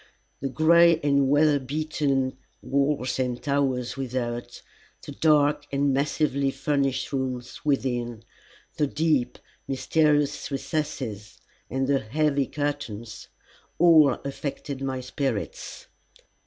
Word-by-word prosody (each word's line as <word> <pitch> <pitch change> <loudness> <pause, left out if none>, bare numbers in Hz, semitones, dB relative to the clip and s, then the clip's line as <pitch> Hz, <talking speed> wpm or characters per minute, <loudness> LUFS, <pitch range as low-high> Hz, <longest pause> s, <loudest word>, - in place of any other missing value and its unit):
The 135 - -3
gray 165 +3 +5
and 140 -2 +2
weather 145 0 +4
beaten 140 -1 -1 0.3
walls 140 -2 0
and 125 -1 -1
towers 135 -4 -1
without, 120 -2 -4 0.4
the - - -8
dark 150 -2 +2
and 140 0 +1
massively 140 0 +1
furnished 135 -2 -1
rooms 130 -2 -4
within, 120 -5 -1 0.5
the 150 - +2
deep, 150 -4 0 0.3
mysterious 145 +1 +1
recesses 135 -7 -4 0.3
and 135 +1 -1
the 135 0 +2
heavy 140 +3 0
curtains, 145 -7 -4 0.5
all 160 -4 +6
affected 140 0 -5
my 135 -1 -2
spirits. 140 - -4
140 Hz, 100 wpm, -25 LUFS, 130-150 Hz, 0.5 s, all